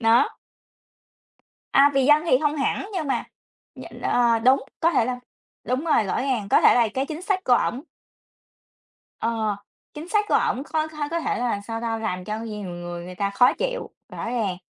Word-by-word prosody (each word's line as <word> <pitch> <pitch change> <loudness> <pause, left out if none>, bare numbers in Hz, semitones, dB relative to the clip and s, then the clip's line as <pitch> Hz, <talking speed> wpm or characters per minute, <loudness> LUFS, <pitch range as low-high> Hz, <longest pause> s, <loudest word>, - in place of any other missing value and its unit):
Đó. 225 +1 +4 1.5
À, 280 +1 +7
vì 270 -1 +3
dân 295 +2 +5
thì 255 - +4
không 295 -1 +1
hẳn 295 +8 -1
nhưng 330 -6 -2
mà 270 - 0 0.5
nh - - -11
ờ, 235 -2 +2
đúng, 260 +4 +4 0.2
có 335 - +3
thể 260 -7 +2
là 250 0 -3 0.4
đúng 255 +6 -2
rồi, 265 -8 +3
rõ 195 - -1
ràng, 255 -7 -1
có - - +5
thể - - +6
là 240 -2 +4
cái 265 +1 -1
chính 315 +3 -6
sách 380 -1 -1
của 250 - +4
ổng 245 +2 0 1.4
Ờ, 220 -3 -1 0.4
chính 310 +4 -8
sách 420 0 +2
của - - -1
ổng 260 - +1
có 310 +1 -1
có 305 -2 -4
có 335 - 0
thể - - -1
là 240 -4 -1
sao 225 0 -4
ta, 230 -1 -2
làm 185 -5 -3
cho 215 +2 -3
nhiều 210 -4 -6
người 175 0 -7
người 180 0 -9
ta 200 +2 -1
khó 245 +6 +4
chịu, - - -3 0.2
rõ - - -6
ràng. 215 -7 -1
250 Hz, 200 wpm, -24 LUFS, 220-300 Hz, 1.5 s, À